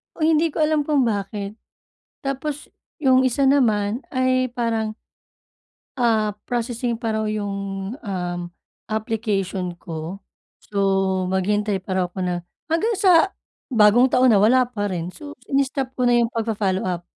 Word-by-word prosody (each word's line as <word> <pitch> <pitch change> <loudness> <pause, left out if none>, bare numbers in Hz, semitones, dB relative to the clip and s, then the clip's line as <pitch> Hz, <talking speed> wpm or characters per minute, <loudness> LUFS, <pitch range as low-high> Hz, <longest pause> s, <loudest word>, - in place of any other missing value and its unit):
Oh, 310 - 0
hindi 320 +1 +3
ko - - -9
alam 305 0 +2
kung 285 -3 +2
bakit. 200 -2 -3 0.7
Tapos 275 +2 -4 0.3
yung 260 -2 +5
isa 260 +2 +2
naman 225 -4 +2
ay 255 0 +2
parang 225 -3 -1 1.0
ah, 220 -4 +2
processing 240 -1 -2
pa 225 -2 -1
raw 220 0 -1
'yong, 200 -1 -3
um, 180 -4 -3 0.5
application 205 -4 -2
ko, 165 +4 -6 0.4
so 205 - -8 0.5
maghintay 205 +2 +1
pa 190 - -4
raw 185 - +2
ako 185 - -8
na 180 - 0 0.4
hanggang 335 +9 +1
sa 365 -1 +5 0.4
bagong 235 +1 +5
taon 250 -1 +4
na, 200 - +5
wala 250 +4 +5
pa 205 -4 -2
rin. 175 -2 -3
So 295 -2 -9 0.2
ini-stop 270 -1 0
ko 250 - +1
na 245 - +4
'yong 235 -1 +2
pag-fo-follow 210 -4 -1
up. 175 -1 -3
225 Hz, 145 wpm, -22 LUFS, 200-260 Hz, 1.0 s, yung